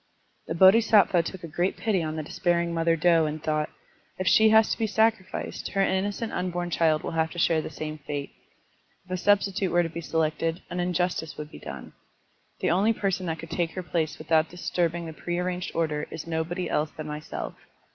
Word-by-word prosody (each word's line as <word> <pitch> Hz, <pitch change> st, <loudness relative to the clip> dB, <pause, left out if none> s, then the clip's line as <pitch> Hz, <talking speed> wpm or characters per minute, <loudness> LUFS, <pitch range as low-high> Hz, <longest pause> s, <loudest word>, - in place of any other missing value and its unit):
*' -, -, -41 dB
The 165 Hz, -, -3 dB
Bodhisattva 195 Hz, -1 st, +6 dB
took 180 Hz, +2 st, -7 dB
a -, -, -5 dB
great 175 Hz, +4 st, -1 dB
pity 210 Hz, -5 st, +1 dB
on 155 Hz, -1 st, -3 dB
the 155 Hz, -, -3 dB
despairing 170 Hz, +2 st, 0 dB
mother 165 Hz, 0 st, +2 dB
doe 165 Hz, -1 st, +4 dB
and 150 Hz, +1 st, -3 dB
thought: 155 Hz, -1 st, 0 dB, 0.5 s
If 185 Hz, -, -3 dB
she 220 Hz, +4 st, +6 dB
has 220 Hz, 0 st, +5 dB
to -, -, 0 dB
be 225 Hz, -, +1 dB
sacrificed, 220 Hz, -2 st, 0 dB
her 195 Hz, -, +2 dB
innocent 200 Hz, +4 st, -1 dB
tmbom 175 Hz, -1 st, -2 dB
child 160 Hz, -2 st, +2 dB
will -, -, -3 dB
have 160 Hz, -1 st, +1 dB
to -, -, -10 dB
share 165 Hz, -1 st, +3 dB
the -, -, -6 dB
same 155 Hz, 0 st, -6 dB
fate. 145 Hz, 0 st, -5 dB, 0.7 s
If 185 Hz, -, -15 dB
a 185 Hz, -, 0 dB
substitute 200 Hz, 0 st, +2 dB
were 175 Hz, +1 st, +4 dB
to 165 Hz, -, -3 dB
be 170 Hz, +1 st, -6 dB
selected, 160 Hz, +1 st, -1 dB
an 180 Hz, -, -3 dB
injustice 175 Hz, -2 st, -1 dB
would 150 Hz, 0 st, -7 dB
be -, -, -10 dB
done. -, -, -8 dB, 0.7 s
The -, -, +2 dB
only 200 Hz, +6 st, +3 dB
person 195 Hz, -3 st, -1 dB
that 160 Hz, -1 st, -2 dB
could 165 Hz, +1 st, -10 dB
take 165 Hz, -1 st, -1 dB
her 185 Hz, -, -4 dB
place 160 Hz, -3 st, -1 dB
with 155 Hz, +1 st, -12 dB
out 160 Hz, 0 st, +4 dB
disturbing 170 Hz, -1 st, -1 dB
the 160 Hz, -, -6 dB
prearranged 180 Hz, +2 st, -3 dB
order 155 Hz, -3 st, -1 dB
is 160 Hz, 0 st, -7 dB
nobody 165 Hz, +2 st, -2 dB
else 150 Hz, -1 st, 0 dB
than 155 Hz, 0 st, -8 dB
myself. 150 Hz, 0 st, -5 dB
170 Hz, 205 wpm, -26 LUFS, 160-185 Hz, 0.7 s, Bodhisattva